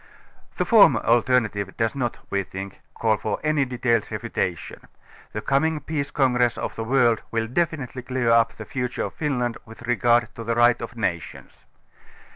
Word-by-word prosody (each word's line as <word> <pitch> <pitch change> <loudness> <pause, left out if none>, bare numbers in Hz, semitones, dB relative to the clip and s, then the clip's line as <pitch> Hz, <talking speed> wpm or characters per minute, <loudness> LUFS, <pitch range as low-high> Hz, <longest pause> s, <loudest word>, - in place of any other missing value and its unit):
The - - 0
former - - +6
alternative 115 -4 +1
does 115 0 0
not, 125 -4 -2
we 100 - +1
think, 95 0 -8
call 110 -2 +1
for - - -2
anj^ 150 -4 +1
detailed 120 -2 0
refutation. 85 -5 -4 0.4
The 105 - -4
coming 155 +5 +1
peace 145 -2 -3
congress 125 -4 +2
of - - -4
the 115 - -4
world 120 -2 +3
will 115 -1 -1
definitively 135 -1 -2
clear 125 -1 0
up 115 -1 +4
the - - -9
future 125 -1 -3
of - - -5
Finland 125 -6 -2
with 115 +1 -13
regard 120 -1 +2
to 115 - -8
the 115 +1 -1
Right 120 0 +4
of 115 +1 -7
Nations. 85 -6 -4
120 Hz, 165 wpm, -24 LUFS, 115-130 Hz, 0.4 s, former